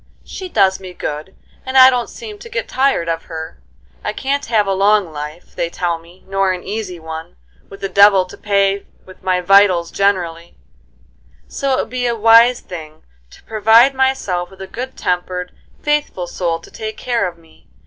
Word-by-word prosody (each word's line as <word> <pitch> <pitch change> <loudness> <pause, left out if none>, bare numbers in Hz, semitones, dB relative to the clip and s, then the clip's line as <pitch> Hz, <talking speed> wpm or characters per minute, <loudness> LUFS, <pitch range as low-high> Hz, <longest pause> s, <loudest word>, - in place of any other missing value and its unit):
She 375 -1 -7
does 195 - +3
me 185 -2 -10
good, 155 +5 -5 0.3
and 260 0 -1
I 260 0 +9
don't 245 -2 -1
seem 430 -3 -9
to 465 - -11
get - - -3
tired 265 -10 +1
of 165 0 -2
her. 160 -1 -8 0.4
I - - -2
can't 280 +1 -2
have 220 -3 +2
a 195 - 0
long 200 -2 +3
life, 150 +2 -8
they 170 - -1
tell 170 -1 -2
me, 170 +3 -19
nor 195 0 +1
an 180 - -6
easy 200 -3 -5
one, 160 - -8 0.3
with 195 - -12
the 195 - -1
devil 200 -1 +5
to 185 - -12
pay 200 -1 0 0.2
with 185 - -15
my 185 -1 0
vitals 185 -2 +4
generally; 175 -4 -1 0.9
so 275 -1 -1
it 260 - +2
would - - -8
be 250 -1 -1
a 235 - 0
wise 230 +2 +6
thing 155 -3 -10 0.3
to - - -18
provide 225 +4 +5
myself 260 -10 0
with 190 0 -11
a - - -5
good 255 +6 -7
tempered, 180 0 -2 0.3
faithful 295 -11 0
soul 170 -1 -2
to - - -15
take 220 -1 -6
care 235 -6 0
of 175 -1 -8
me. 165 -1 -23
195 Hz, 190 wpm, -18 LUFS, 175-235 Hz, 0.9 s, I